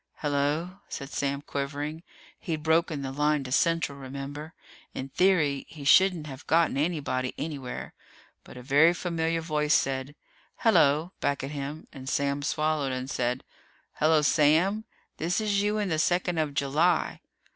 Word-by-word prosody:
"Hello!" 150 Hz, +6 st, -1 dB
said 140 Hz, +1 st, -6 dB
Sam, 140 Hz, 0 st, -2 dB
quivering. 145 Hz, +3 st, -4 dB, 0.4 s
He'd 155 Hz, -3 st, -4 dB
broken 160 Hz, -2 st, +1 dB
the 135 Hz, -, -4 dB
line 150 Hz, +1 st, +1 dB
to 130 Hz, -, -8 dB
Central, 165 Hz, -1 st, +1 dB
remember. 140 Hz, +3 st, -7 dB, 0.4 s
In 135 Hz, -, -5 dB
theory, 155 Hz, -5 st, +2 dB
he 150 Hz, -3 st, -10 dB
shouldn't 180 Hz, +2 st, +5 dB
have 140 Hz, -1 st, -9 dB
gotten 165 Hz, -2 st, +3 dB
anybody 140 Hz, -4 st, -1 dB
anywhere. 145 Hz, -5 st, -5 dB, 0.5 s
But -, -, -13 dB
a 125 Hz, -, -9 dB
very 145 Hz, +6 st, +5 dB
familiar 165 Hz, -1 st, -1 dB
voice 150 Hz, -2 st, +1 dB
said 135 Hz, +1 st, -1 dB, 0.4 s
"Hello" 160 Hz, -6 st, +3 dB
back 140 Hz, -1 st, -1 dB
at 135 Hz, -, -4 dB
him, 145 Hz, +2 st, -5 dB
and 135 Hz, -2 st, -7 dB
Sam 140 Hz, 0 st, 0 dB
swallowed 155 Hz, -1 st, 0 dB
and 130 Hz, +1 st, -4 dB
said, 125 Hz, 0 st, -1 dB, 0.6 s
"Hello, 155 Hz, 0 st, +4 dB
Sam. 165 Hz, +9 st, +3 dB, 0.3 s
This 170 Hz, +5 st, 0 dB
is 205 Hz, -2 st, +1 dB
you 210 Hz, +1 st, 0 dB
in 205 Hz, -2 st, -1 dB
the 155 Hz, -2 st, 0 dB
second 175 Hz, 0 st, +1 dB
of 150 Hz, -2 st, -1 dB
July." 155 Hz, +5 st, +1 dB
150 Hz, 150 wpm, -27 LUFS, 140-165 Hz, 0.6 s, shouldn't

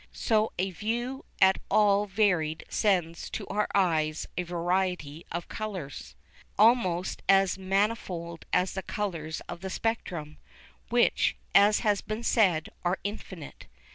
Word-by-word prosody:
So 220 Hz, -1 st, +1 dB
a 190 Hz, +2 st, 0 dB
view 240 Hz, +8 st, -3 dB
at 190 Hz, 0 st, +5 dB
all 205 Hz, -1 st, +4 dB
varied 180 Hz, -6 st, +1 dB
sends 175 Hz, -5 st, 0 dB
to -, -, -5 dB
our 210 Hz, +2 st, 0 dB
eyes 160 Hz, -5 st, +1 dB
a -, -, 0 dB
variety 175 Hz, -3 st, -2 dB
of 170 Hz, +1 st, -4 dB
colours, 190 Hz, -10 st, -6 dB, 0.4 s
almost 200 Hz, -6 st, +3 dB
as 195 Hz, -1 st, +5 dB
manifold 190 Hz, -4 st, -1 dB
as 180 Hz, +1 st, +2 dB
the 190 Hz, -, -3 dB
colours 165 Hz, -6 st, -4 dB
of 175 Hz, 0 st, -8 dB
the 190 Hz, -, -4 dB
spectrum, 175 Hz, -9 st, -3 dB, 0.5 s
which, -, -, +2 dB, 0.2 s
as 205 Hz, +3 st, +6 dB
has 210 Hz, -3 st, +2 dB
been 215 Hz, +2 st, -5 dB
said, 185 Hz, -10 st, +2 dB
are 180 Hz, +2 st, +1 dB
infinite. 190 Hz, -6 st, -7 dB
190 Hz, 130 wpm, -28 LUFS, 170-210 Hz, 0.5 s, as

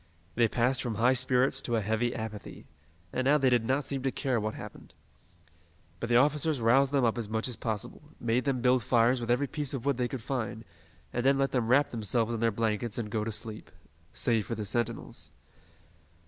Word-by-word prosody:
They 115 Hz, +3 st, +3 dB
passed 125 Hz, +4 st, +1 dB
from 120 Hz, -4 st, -3 dB
high 120 Hz, +4 st, +4 dB
spirits 130 Hz, +1 st, +2 dB
to 120 Hz, -, -2 dB
a 110 Hz, -, +1 dB
heavy 110 Hz, +4 st, 0 dB
apathy, 110 Hz, -2 st, -7 dB, 0.5 s
and 130 Hz, -, -1 dB
now 145 Hz, +2 st, +5 dB
they 135 Hz, -3 st, +2 dB
did 120 Hz, -2 st, +3 dB
not 135 Hz, +5 st, 0 dB
seem 135 Hz, -1 st, -4 dB
to 135 Hz, 0 st, 0 dB
care 130 Hz, -3 st, -1 dB
what 110 Hz, 0 st, -3 dB
happened. -, -, -11 dB, 1.0 s
But 115 Hz, -, -4 dB
the 120 Hz, -, +3 dB
officers 150 Hz, +2 st, +2 dB
roused 130 Hz, +4 st, +4 dB
them 140 Hz, -3 st, +2 dB
up 115 Hz, +1 st, +1 dB
as 110 Hz, -3 st, -4 dB
much 110 Hz, +2 st, 0 dB
as 125 Hz, -, -3 dB
possible, 110 Hz, +1 st, -4 dB, 0.2 s
made 120 Hz, +2 st, 0 dB
them 135 Hz, -3 st, 0 dB
build 125 Hz, 0 st, +3 dB
fires 120 Hz, +2 st, +3 dB
with 120 Hz, -, -5 dB
every 125 Hz, +4 st, +2 dB
piece 145 Hz, 0 st, -3 dB
of 130 Hz, -1 st, -6 dB
wood 140 Hz, -3 st, +1 dB
they 125 Hz, -1 st, 0 dB
could 120 Hz, -2 st, -6 dB
find, 115 Hz, -4 st, -3 dB, 0.5 s
and 120 Hz, -, -1 dB
then 135 Hz, +1 st, +4 dB
let 135 Hz, 0 st, +1 dB
them 120 Hz, -4 st, 0 dB
wrap 135 Hz, +4 st, +3 dB
themselves 115 Hz, +1 st, 0 dB
in 115 Hz, -, -2 dB
their 115 Hz, 0 st, +3 dB
blankets 110 Hz, 0 st, -1 dB
and 110 Hz, -3 st, -4 dB
go 110 Hz, -1 st, -1 dB
to 110 Hz, -, -3 dB
sleep 110 Hz, 0 st, -6 dB, 0.4 s
save 115 Hz, -4 st, 0 dB
for 115 Hz, -, -3 dB
the 105 Hz, -1 st, -4 dB
sentinels. 115 Hz, +2 st, -2 dB
120 Hz, 215 wpm, -29 LUFS, 115-130 Hz, 1.0 s, now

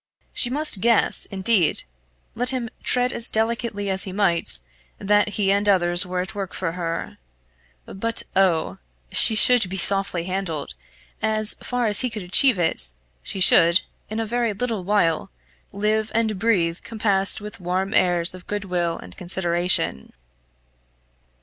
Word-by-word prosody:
She 245 Hz, -, 0 dB
must 285 Hz, -7 st, 0 dB
guess, 230 Hz, -2 st, +1 dB
indeed, 190 Hz, -3 st, 0 dB, 0.5 s
let 245 Hz, +2 st, -1 dB
him 245 Hz, -4 st, -3 dB
tread 250 Hz, 0 st, 0 dB
as 235 Hz, -, -3 dB
delicately 220 Hz, -2 st, -2 dB
as 190 Hz, -1 st, +1 dB
he 190 Hz, -, -2 dB
might, 185 Hz, -, -1 dB, 0.4 s
that 205 Hz, +1 st, +1 dB
he 195 Hz, -2 st, +1 dB
and 200 Hz, +1 st, +1 dB
others 175 Hz, -2 st, +5 dB
were 180 Hz, 0 st, -3 dB
at 185 Hz, -, -7 dB
work 200 Hz, -3 st, -6 dB
for 185 Hz, -3 st, -3 dB
her. 165 Hz, -, -6 dB, 0.7 s
But 230 Hz, +4 st, -4 dB
oh! 165 Hz, -, 0 dB, 0.3 s
she 220 Hz, -, +10 dB
should 225 Hz, -2 st, +4 dB
be 190 Hz, -, -5 dB
softly 195 Hz, -2 st, 0 dB
handled; 185 Hz, -4 st, -4 dB, 0.5 s
as 215 Hz, 0 st, +2 dB
far 245 Hz, -1 st, -3 dB
as 210 Hz, -2 st, +2 dB
he 255 Hz, -, -1 dB
could 215 Hz, -3 st, -7 dB
achieve 220 Hz, +6 st, +3 dB
it, 160 Hz, -, +2 dB, 0.3 s
she 195 Hz, -, -5 dB
should, 170 Hz, 0 st, +5 dB, 0.3 s
in 215 Hz, +1 st, -5 dB
a 225 Hz, -, -2 dB
very 235 Hz, 0 st, -2 dB
little 220 Hz, -2 st, -4 dB
while, 175 Hz, -5 st, 0 dB, 0.4 s
live 215 Hz, +2 st, -2 dB
and 220 Hz, -3 st, -1 dB
breathe 180 Hz, -6 st, 0 dB
compassed 205 Hz, -4 st, 0 dB
with 210 Hz, -1 st, -10 dB
warm 185 Hz, +3 st, -3 dB
airs 175 Hz, -1 st, +1 dB
of 185 Hz, -1 st, -14 dB
good 205 Hz, -1 st, -4 dB
will 175 Hz, -2 st, -2 dB
and 90 Hz, -, -13 dB
consideration. 175 Hz, -, -1 dB
195 Hz, 150 wpm, -21 LUFS, 180-220 Hz, 0.7 s, she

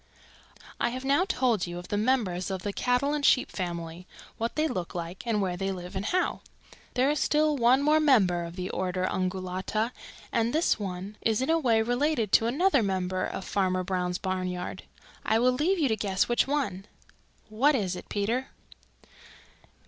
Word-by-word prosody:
"I -, -, +2 dB
have 255 Hz, +2 st, -6 dB
now 285 Hz, +7 st, +3 dB
told 240 Hz, -, +1 dB
you 175 Hz, 0 st, -6 dB
of 175 Hz, 0 st, -9 dB
the -, -, -1 dB
members 210 Hz, -6 st, 0 dB
of 190 Hz, -1 st, -4 dB
the 205 Hz, -, -3 dB
cattle 250 Hz, +6 st, +1 dB
and 295 Hz, -1 st, -2 dB
Sheep 260 Hz, -, +4 dB
family, 170 Hz, -1 st, -5 dB, 0.3 s
what 230 Hz, +1 st, -2 dB
they 310 Hz, +1 st, +2 dB
look 180 Hz, -, -4 dB
like 170 Hz, +1 st, -5 dB
and 210 Hz, -3 st, +1 dB
where 180 Hz, -2 st, -1 dB
they 195 Hz, +2 st, -2 dB
live 180 Hz, 0 st, -7 dB
and 190 Hz, +1 st, -3 dB
how. 365 Hz, +7 st, 0 dB, 0.5 s
There 260 Hz, +3 st, +3 dB
is 300 Hz, -, -1 dB
still 305 Hz, 0 st, +2 dB
one 255 Hz, +2 st, +4 dB
more 305 Hz, +1 st, +4 dB
member 200 Hz, -, +3 dB
of 170 Hz, 0 st, -7 dB
the 185 Hz, 0 st, -4 dB
order 185 Hz, 0 st, -1 dB
Ungulata 185 Hz, +4 st, -2 dB, 0.4 s
and 230 Hz, 0 st, +1 dB
this 320 Hz, -7 st, +2 dB
one 195 Hz, +1 st, -5 dB
is 220 Hz, -1 st, +1 dB
in 260 Hz, +5 st, +1 dB
a 330 Hz, -, +3 dB
way 230 Hz, -6 st, +3 dB
related 245 Hz, -2 st, 0 dB
to 225 Hz, -, +5 dB
another 285 Hz, +3 st, +3 dB
member 185 Hz, -2 st, -1 dB
of 190 Hz, -, -5 dB
Farmer 185 Hz, -2 st, 0 dB
Brown's 180 Hz, -1 st, -1 dB
barnyard. 185 Hz, -1 st, -4 dB, 0.4 s
I 220 Hz, -, +2 dB
will 250 Hz, +2 st, +4 dB
leave 310 Hz, +10 st, +1 dB
you 305 Hz, -5 st, +2 dB
to 220 Hz, -, +2 dB
guess 195 Hz, -3 st, 0 dB
which 240 Hz, +2 st, +2 dB
one. 215 Hz, -10 st, -2 dB, 0.6 s
What 270 Hz, +8 st, +3 dB
is 190 Hz, -7 st, -1 dB
it, -, -, -10 dB
Peter?" 230 Hz, +6 st, -1 dB
210 Hz, 185 wpm, -28 LUFS, 185-260 Hz, 0.6 s, to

